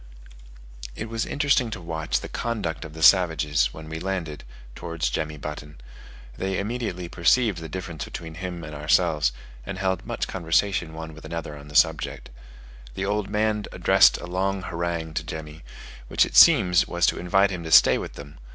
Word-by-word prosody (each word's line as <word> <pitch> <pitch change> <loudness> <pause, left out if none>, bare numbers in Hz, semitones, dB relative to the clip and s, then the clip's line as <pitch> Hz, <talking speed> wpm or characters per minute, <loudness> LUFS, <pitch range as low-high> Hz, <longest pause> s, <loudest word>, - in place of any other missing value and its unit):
It 110 - -6
was 115 0 -2
interesting 140 -4 +1
to 110 - -6
watch 80 -2 -2
the - - -6
conduct 85 - -3
of 75 - -10
the 80 - -4
savages, 80 -7 +4
when 80 +3 -10
we 80 +1 -6
landed, 85 -5 -4 0.3
towards 85 +1 -3
Jemmy 75 -1 -3
Button: 75 0 -8 0.6
they 95 +4 -2
immediately 105 -4 -3
perceived 95 +4 +2
the 80 -1 -8
difference 85 -3 -6
between 80 -1 -8
him 90 0 -6
and 75 -1 -8
ourselves, 75 -2 +2 0.3
and 95 - -6
held 95 -2 -1
much - - -3
conversation 85 -1 0
one 80 0 -7
with 80 - -13
another 85 -3 -6
on 70 0 -12
the 75 - -12
subject. - - +1 0.6
The 95 - -2
old 105 0 -1
man 105 0 0
addressed 95 +2 +5
a - - -8
long 95 +2 -2
harangue 85 -2 -3
to - - -2
Jemmy, 80 0 -8 0.5
which - - +3
it - - -9
seems 90 -2 +6
was - - +1
to - - +1
invite 95 +3 +2
him 90 -2 -5
to 80 - -6
stay - - +7
with - - -7
them. 70 0 -12
85 Hz, 180 wpm, -24 LUFS, 80-95 Hz, 0.6 s, stay